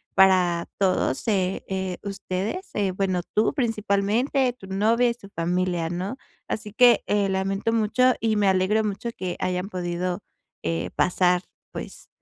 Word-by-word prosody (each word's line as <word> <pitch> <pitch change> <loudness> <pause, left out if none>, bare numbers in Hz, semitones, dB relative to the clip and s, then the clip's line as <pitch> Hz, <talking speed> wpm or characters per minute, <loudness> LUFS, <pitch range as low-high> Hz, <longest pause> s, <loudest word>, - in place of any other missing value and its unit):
para 180 -3 +4
todos, 185 - +1
eh 190 -3 0
eh, 190 -1 -3
ustedes, 200 - -4
eh, 200 -2 +1
bueno, 185 -1 0
tú 215 +6 +3
principalmente, 230 +2 +1
tu 220 -6 -14
novia, 220 +5 +2
y - - -3
su 200 -4 -14
familia, 175 -1 -1
¿No? 190 +9 -3 0.3
Así 210 -1 -4
que, 245 -2 +6
eh, 205 -1 +1
lamento 195 +3 0
mucho 230 +3 +3
y 220 -1 +1
me 205 -1 +2
alegro 190 +3 +3
mucho 210 +3 -3
que 180 -1 -4
hayan 180 +2 -1
podido, 180 -1 -3 0.4
eh, 85 +2 -1
pasar 180 0 +2 0.3
pues - - -8
195 Hz, 145 wpm, -25 LUFS, 180-220 Hz, 0.4 s, que